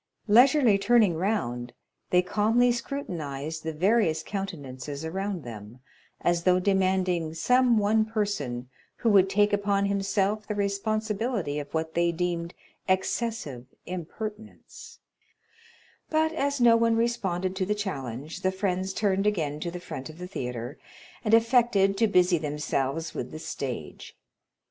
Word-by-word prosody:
Leisurely 240 -1 +5
turning 210 -4 +4
round, 125 - -2 0.4
they 180 0 +4
calmly 225 +6 +3
scrutinized 160 - -4
the 160 - -3
various 180 +1 +2
countenances 145 -7 -5
around 190 0 -3
them, 110 0 -9 0.4
as 175 0 +1
though 180 +1 +3
demanding 185 -4 +1
some 250 +7 +3
one 215 +1 +3
person 200 - -2 0.3
who 230 - 0
would 195 -2 +5
take 205 +1 +2
upon 200 -1 +1
himself 200 +1 0
the 210 - -2
responsibility 205 - -1
of 145 - -7
what 160 0 -2
they 170 0 +2
deemed 170 0 -3 0.3
excessive 190 - -1 0.2
impertinence; 210 +5 -8 1.1
but 315 +1 +1
as 280 -2 -1
no 235 -1 +6
one 230 0 +3
responded 190 -6 -1
to 190 - -1
the 210 - +1
challenge, 150 - -5
the 185 - +1
friends 190 0 -2
turned 195 -1 +1
again 155 -8 -1
to 170 - -3
the 180 +1 -6
front 135 -5 -7
of 155 - -11
the 180 - -6
theatre, 125 -6 -5 0.4
and 220 0 +5
affected 230 -4 +3
to 225 +3 +3
busy 180 -3 +3
themselves 150 0 -2
with 125 - -4
the - - -8
stage. 125 - -6
190 Hz, 135 wpm, -27 LUFS, 160-215 Hz, 1.1 s, no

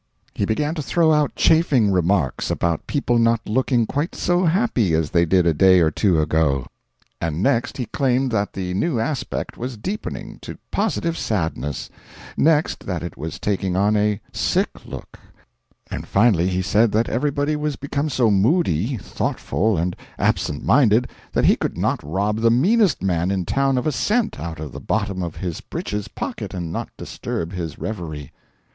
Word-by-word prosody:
He 100 - -1
began 145 +9 0
to 160 - -3
throw 160 +2 +2
out 150 -2 +1
chaffing 140 -10 +4
remarks 90 -5 +1
about 85 -2 -1
people 120 -5 +1
not 115 0 +2
looking 120 +1 +2
quite 145 +8 -2
so 180 +1 +1
happy 160 - +2
as 80 -2 0
they 85 0 +3
did 90 +1 +3
a 85 - +4
day 95 +4 +5
or 80 -2 +3
two 90 0 +2
ago; 75 -3 +1 0.6
and 85 +2 -1
next 120 -2 +1
he 125 - -2
claimed 130 +2 0
that 105 -2 -1
the 90 -1 -3
new 120 - 0
aspect 130 +2 -3
was 125 -1 -4
deepening 195 - -5
to - - -8
positive 185 -5 0
sadness; 80 - -2 0.4
next, 155 0 +2
that 90 -3 -2
it 85 - -6
was 80 +2 -6
taking 95 -3 -1
on 100 +3 +3
a 105 0 +1
sick - - +1 0.2
look; - - -9 0.7
and - - -5
finally 100 -5 +3
he 95 0 0
said 105 +3 +3
that 115 +2 +2
everybody 145 +4 0
was 150 -1 -2
become 140 +2 -2
so 120 -5 +2
moody, 110 - +2
thoughtful, 105 +1 -1
and 85 +2 -1 0.2
absent 75 - 0
minded 120 +1 +4 0.2
that - - +1
he - - +6
could - - -3 0.3
rob 100 +8 -1
the 115 0 +4
meanest 185 - +3
man 90 -2 +1
in 95 -2 -1
town 135 +3 +1
of 125 - -1
a 155 - +2
cent 215 - 0
out 80 -2 -5
of 75 -3 -6
the - - -7
bottom 100 -1 -1
of 85 -2 -4
his 90 -4 -4
breeches 105 -1 -4
pocket - - -5
and 85 -3 -4
not - - -4
disturb 85 +2 -5
his 85 -4 -5
reverie. 80 -9 -5
105 Hz, 175 wpm, -22 LUFS, 90-135 Hz, 0.7 s, he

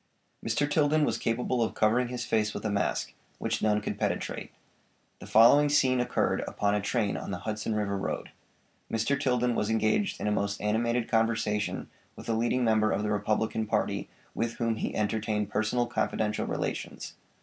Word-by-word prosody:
Mr. 145 - +1
Tilden 150 0 +3
was 115 -3 -1
capable 125 +2 0
of 115 - 0
covering 115 +3 +2
his 125 0 -4
face 110 -1 0
with - - -5
a 105 - 0
mask, 100 - -1 0.2
which - - -2
none 105 -1 +2
could - - -4
penetrate. - - -2 0.7
The - - -10
following 140 +7 +6
scene 130 -3 +3
occurred 125 - 0
upon 100 0 0
a 105 - +1
train 105 -1 0
on - - -5
the 100 - -3
Hudson 110 0 -2
River 105 -2 -1
road. 95 - -3 0.6
Mr. 115 +5 +1
Tilden 125 -3 +2
was 105 - -1
engaged 110 - +1
in - - -3
a 105 - +1
most 100 -1 -1
animated 115 +3 0
conversation 110 -2 0 0.3
with - - -11
a 115 - +1
leading 120 +3 +1
member 110 -2 +3
of 105 - 0
the 105 - -1
Republican 110 +1 0
party - - -1 0.2
with 115 0 -1
whom 115 -2 -1
he - - -3
entertained 105 0 -1
personal 115 +3 +1
confidential 110 -2 -1
relations. - - -4
110 Hz, 175 wpm, -29 LUFS, 105-120 Hz, 0.7 s, following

